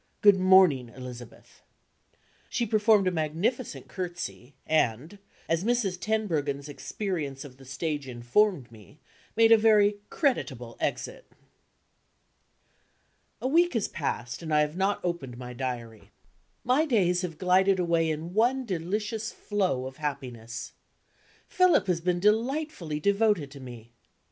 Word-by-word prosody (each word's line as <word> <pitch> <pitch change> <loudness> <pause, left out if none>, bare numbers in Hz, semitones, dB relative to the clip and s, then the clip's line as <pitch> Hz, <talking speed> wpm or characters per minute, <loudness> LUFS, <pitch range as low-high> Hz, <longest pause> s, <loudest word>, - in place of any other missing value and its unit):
Good 200 -2 +6
morning, 185 -10 +5
Elizabeth." 125 -1 -11 0.9
She 235 - -1
performed 215 -2 +3
a - - +2
magnificent 175 - -2
curtsey, 175 -7 -6
and 155 - 0 0.3
(as 165 +2 0
Mrs. 215 -6 0
Tenbruggen's 155 -11 -1
experience 150 -3 -4
of 130 -2 -12
the 135 - -15
stage 145 +2 -3
informed 125 - +1
me) 115 +6 -16 0.4
made 225 0 +6
a 225 - +8
very 210 -2 +4
creditable 130 - -1
exit. - - -4 2.1
A - - +1
week 335 +2 +3
has 225 - +1
passed, 125 -4 -4
and 160 -2 -6
I 150 0 +4
have 150 +1 -1
not 195 +2 0
opened 140 -9 -3
my 125 0 -8
Diary. 120 -3 -6 0.5
My 265 +6 +2
days 180 - +2
have 170 -4 -5
glided 185 +2 +3
away 170 -2 +1
in 160 +3 -4
one 250 +5 +2
delicious 210 +4 -3
flow 185 -11 -1
of 130 0 -8
happiness. 125 -6 -5 0.7
Philip 365 -1 +3
has 180 -3 0
been 175 0 0
delightfully 220 - 0
devoted 200 -5 +1
to 140 - -11
me. 120 -3 -11
175 Hz, 130 wpm, -27 LUFS, 135-210 Hz, 2.1 s, a